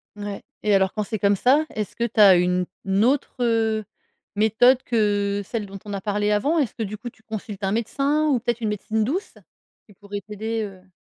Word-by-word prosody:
Ouais 205 -1 -6 0.2
et 210 -1 +3
alors 190 -1 +3
quand 215 - -1
c'est 215 +1 -4
comme 200 +1 +3
ça, 275 +9 +3
est-ce 215 -2 -5
que 235 - -2
tu 230 -1 -2
as 195 -3 +9
une 180 +1 +2 0.4
autre, 275 +2 +1
heu, 225 -2 +1 0.5
méthode 230 +5 +4
que 205 -3 +1
celle 220 +1 -3
dont 195 0 -9
on 205 - -6
a 195 - -3
parlé 205 +1 0
avant? 280 +11 +2
Est-ce 270 -8 0
que, 225 - -4
du 215 0 -5
coup, 240 +3 -7
tu 220 - -26
consultes 215 -2 -7
un 195 - +1
médecin 275 +7 0
ou 275 -5 +2
peut-être 240 0 -2
une 220 - 0
médecine 215 +1 -1
douce 345 - -3 0.5
qui 205 - -18
pourrait 200 +1 -7
t'aider, 215 +3 -4
heu? 190 -2 -10
215 Hz, 210 wpm, -23 LUFS, 200-235 Hz, 0.5 s, as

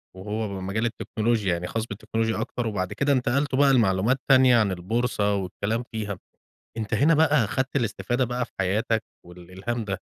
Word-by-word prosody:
وهو 105 +3 -3
م 95 -2 -5
مجال 110 +4 -1
التكنولوجيا، 110 -3 0
يعني 85 +1 -3
خاص 115 +3 -2
بالتكنولوجيا 110 +1 -2
أكتر 120 0 -3
وبعد 95 -4 -2
كده 140 0 +1
انتقلتم 135 +1 +1
بقى 140 -1 +5
لمعلومات 110 +1 +3
تانية 130 -2 +6
عن 105 -4 +2
البورصة 105 +2 0
والكلام 100 +4 -2
فيها. 105 -4 -4 0.6
أنت 110 -1 -4
هنا 145 +9 +4
بقى 150 -4 +4
أخدت 130 +6 -2
الاستفادة 120 +1 0
بقى 125 +1 -2
في - - -26
حياتك 110 +4 +1 0.2
والإلهام 95 +7 -6
ده، 100 -2 -3
110 Hz, 165 wpm, -25 LUFS, 100-125 Hz, 0.6 s, تانية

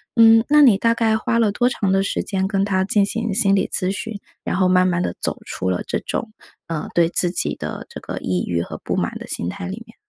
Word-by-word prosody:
嗯， 225 -1 +7
那 300 0 +6
你 240 -8 +6
大 230 +3 +2
概 225 -1 +1
花 230 +1 -1
了 220 -3 +3
多 245 +4 +1
长 200 -5 -1
的 195 0 +3
时 195 - -2
间 190 -1 -1
跟 195 -1 0
他 190 -2 +1
进 200 0 +2
行 225 0 -2
心 195 -2 +3
理 195 - +2
咨 185 +1 +1
询， 210 +2 -5 0.3
然 - - -2
后 185 0 +2
慢 185 0 +4
慢 175 -1 0
地 85 - -2
走 - - -1
出 95 - -3
了 90 - -1
这 - - -2
种， 220 - -4 0.4
呃， 165 -2 -4
对 170 -1 +3
自 175 - +3
己 175 - 0
的 - - -6
这 - - -8
个 - - -7
抑 90 -1 -2
郁 85 -1 -1
和 - - -6
不 - - -2
满 - - -2
的 - - -9
心 85 - -2
态 185 - -6
里 210 +5 -7
面？ 225 - -18
195 Hz, 280 characters per minute, -21 LUFS, 185-225 Hz, 0.4 s, 嗯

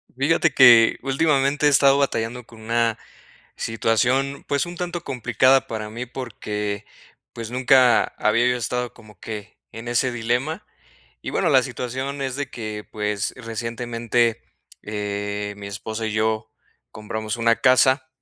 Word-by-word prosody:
Fíjate 155 +3 +2
que 120 -4 +7
últimamente 140 0 +1
he - - +6
estado 140 0 +5
batallando 125 -2 -1
con 115 -1 -15
una 115 0 0 0.6
situación, 125 +5 0
pues, 140 +2 0
un 175 0 -8
tanto 175 0 -4
complicada 130 0 +2
para 110 -1 -5
mí 120 +3 -6
porque, 105 -4 -5 0.5
pues, 115 -1 -7
nunca 125 -1 +5
había 115 +3 +2
yo 125 0 +1
estado 125 +1 -3
como 110 -3 -17
que 105 -2 -8
en 115 +1 -9
ese 120 +2 +1
dilema. 125 - -2 0.6
Y - - -5
bueno, - - +1
la - - +5
situación 130 +3 -4
es 130 -1 -3
de 145 0 -3
que, 110 -2 -6
pues, 105 -1 -2
recientemente, 115 0 -1 0.4
eh, 105 0 -4
mi 100 - -8
esposa 110 +2 -5
y 110 - -3
yo 110 0 -1 0.4
compramos 110 0 -5
una 115 0 +3
casa, 130 +1 +3
120 Hz, 140 wpm, -22 LUFS, 110-130 Hz, 0.6 s, que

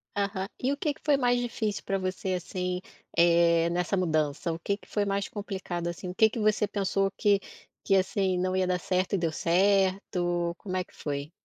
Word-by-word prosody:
Aham. 200 -1 -1
E 260 - +1
o - - -5
que 295 0 0
que - - -21
foi 295 -2 +5
mais 245 -2 +2
difícil 220 -4 -2
pra 195 - 0
você 185 0 -2
assim, 180 0 -3 0.4
eh, 170 0 +5
nessa 175 +3 0
mudança? 155 -2 0
O - - -4
que 200 +4 -1
que - - -20
foi 205 -1 0
mais 200 0 -1
complicado 190 -4 -4
assim? 170 +1 -5
O 180 - -6
que 220 +3 +5
que 230 - -5
você 215 0 +2
pensou 195 -1 0
que 200 -1 +2 0.4
que, 195 - +3
assim, 190 -1 +1
não 185 +1 0
ia 185 0 +1
dar 180 0 +1
certo, 185 +1 -1
e - - +4
deu 165 -3 0
certo? 180 -1 +1
Como 185 -2 -5
é 185 - 0
que - - -25
foi? 145 0 -4
185 Hz, 210 wpm, -28 LUFS, 175-200 Hz, 0.4 s, foi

